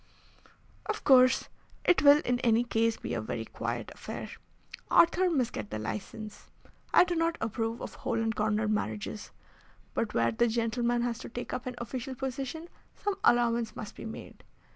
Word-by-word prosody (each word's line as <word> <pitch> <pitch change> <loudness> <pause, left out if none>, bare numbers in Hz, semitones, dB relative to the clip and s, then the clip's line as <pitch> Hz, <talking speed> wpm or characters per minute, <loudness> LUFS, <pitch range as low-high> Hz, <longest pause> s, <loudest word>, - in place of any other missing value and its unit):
"Of 430 0 -3
course, 255 -2 +6 0.4
it 360 - +5
will 290 +1 +7
in 245 0 +1
any 235 -1 +3
case 230 -1 +1
be - - -5
a - - -1
very - - -4
quiet - - -4
affair. - - -7 0.6
Arthur 360 +2 +5
must 265 -8 0
get 105 -1 -5
the 110 - -4
license. 210 - -6 0.4
I - - +7
do 360 - -2
not 330 0 +1
approve 225 +1 -2
of - - -6
hole 235 -3 -2
and 225 -1 0
corner 215 0 +1
marriages, 110 - -3 0.6
but - - -2
where 115 0 +3
the 235 - +2
gentleman 235 +1 0
has 235 -1 -2
to - - -8
take 245 +1 -6
up 250 - -4
an 250 - -4
official 255 +2 -5
position 270 +5 -4 0.3
some 410 - -1
allowance 235 -2 +3
must 210 - -7
be - - -8
made. 220 - -9
235 Hz, 170 wpm, -30 LUFS, 225-265 Hz, 0.6 s, will